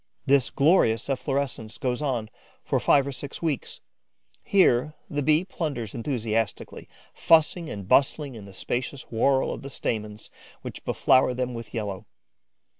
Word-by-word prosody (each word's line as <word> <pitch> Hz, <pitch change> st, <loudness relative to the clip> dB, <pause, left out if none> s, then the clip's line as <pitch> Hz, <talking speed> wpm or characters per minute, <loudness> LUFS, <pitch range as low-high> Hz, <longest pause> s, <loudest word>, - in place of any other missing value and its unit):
This 140 Hz, -2 st, +3 dB
glorious 140 Hz, -, +3 dB
efflorescence 135 Hz, -4 st, -2 dB
goes 125 Hz, 0 st, -2 dB
on 120 Hz, -7 st, -2 dB, 0.3 s
for -, -, 0 dB
five 140 Hz, -2 st, +4 dB
or 140 Hz, -, -3 dB
six 140 Hz, +1 st, -7 dB
weeks. 155 Hz, -6 st, -3 dB, 0.6 s
Here, 155 Hz, -7 st, +3 dB, 0.2 s
the 145 Hz, -1 st, -1 dB
Bees 155 Hz, +5 st, +3 dB
plunder 150 Hz, -10 st, -3 dB
enthusiastically, 115 Hz, -4 st, -3 dB, 0.2 s
fussing 165 Hz, +1 st, +3 dB
and 100 Hz, -7 st, -7 dB
bustling 140 Hz, +2 st, +2 dB
in 110 Hz, -4 st, -10 dB
the 100 Hz, -, -11 dB
spacious 130 Hz, +6 st, -3 dB
whorl 130 Hz, +4 st, +2 dB
of -, -, -8 dB
the 140 Hz, -, -7 dB
stamens, 105 Hz, -5 st, -4 dB, 0.3 s
which -, -, -7 dB
beflour 130 Hz, -1 st, +3 dB
them 125 Hz, 0 st, -2 dB
with 115 Hz, -2 st, -8 dB
yellow. 100 Hz, -4 st, -4 dB
130 Hz, 140 wpm, -26 LUFS, 115-145 Hz, 0.6 s, five